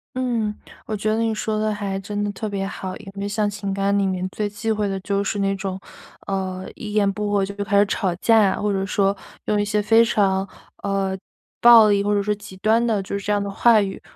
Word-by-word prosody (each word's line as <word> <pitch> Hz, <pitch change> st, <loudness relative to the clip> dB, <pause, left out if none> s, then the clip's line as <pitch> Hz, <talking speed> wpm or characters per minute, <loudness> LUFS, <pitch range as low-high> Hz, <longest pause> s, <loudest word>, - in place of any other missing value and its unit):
嗯， 235 Hz, -5 st, -1 dB, 0.3 s
我 220 Hz, -, -2 dB
觉 215 Hz, +1 st, -1 dB
得 220 Hz, +1 st, +1 dB
你 225 Hz, -1 st, +1 dB
说 215 Hz, 0 st, -2 dB
得 215 Hz, 0 st, 0 dB
还 200 Hz, -2 st, -3 dB
真 205 Hz, +2 st, -4 dB
的 205 Hz, -, -1 dB
特 215 Hz, +1 st, -4 dB
别 195 Hz, -1 st, -3 dB
好， 190 Hz, -1 st, -6 dB
因 -, -, -11 dB
为 200 Hz, 0 st, -4 dB
像 205 Hz, 0 st, 0 dB
情 200 Hz, -1 st, -4 dB
感 200 Hz, +1 st, +1 dB
里 200 Hz, -, +2 dB
面 185 Hz, -1 st, -1 dB
最 205 Hz, +2 st, -3 dB
忌 215 Hz, +2 st, -5 dB
讳 215 Hz, -1 st, +1 dB
的 195 Hz, 0 st, -3 dB
就 200 Hz, +1 st, -1 dB
是 200 Hz, +1 st, -2 dB
那 195 Hz, 0 st, +1 dB
种， 190 Hz, -1 st, -4 dB, 0.5 s
呃 190 Hz, -1 st, -3 dB
一 210 Hz, -, -7 dB
言 205 Hz, -2 st, +3 dB
不 210 Hz, 0 st, -3 dB
合 200 Hz, -1 st, +2 dB
就 200 Hz, +1 st, -8 dB
比 -, -, -19 dB
如 -, -, -9 dB
开 200 Hz, 0 st, +3 dB
始 205 Hz, -, +5 dB
吵 195 Hz, -2 st, -1 dB
架 225 Hz, +5 st, +3 dB
啊， -, -, -3 dB
或 205 Hz, -1 st, 0 dB
者 195 Hz, 0 st, -1 dB
说， 195 Hz, 0 st, +1 dB, 0.3 s
用 210 Hz, -1 st, +1 dB
一 -, -, +1 dB
些 210 Hz, 0 st, 0 dB
非 225 Hz, +2 st, +5 dB
常 195 Hz, -4 st, +1 dB, 0.4 s
呃， 195 Hz, -1 st, -1 dB, 0.4 s
暴 235 Hz, -2 st, +9 dB
力 200 Hz, -1 st, +2 dB
或 205 Hz, +1 st, +1 dB
者 205 Hz, -, +2 dB
是 210 Hz, +1 st, 0 dB
极 200 Hz, -2 st, -12 dB
端 220 Hz, +4 st, +2 dB
的 220 Hz, -4 st, +1 dB
就 195 Hz, +1 st, -4 dB
是 200 Hz, -, -8 dB
这 210 Hz, -, 0 dB
样 205 Hz, 0 st, +2 dB
的 200 Hz, -, -3 dB
话 225 Hz, +2 st, +4 dB
语， 195 Hz, -1 st, -4 dB
205 Hz, 275 characters per minute, -22 LUFS, 195-215 Hz, 0.5 s, 暴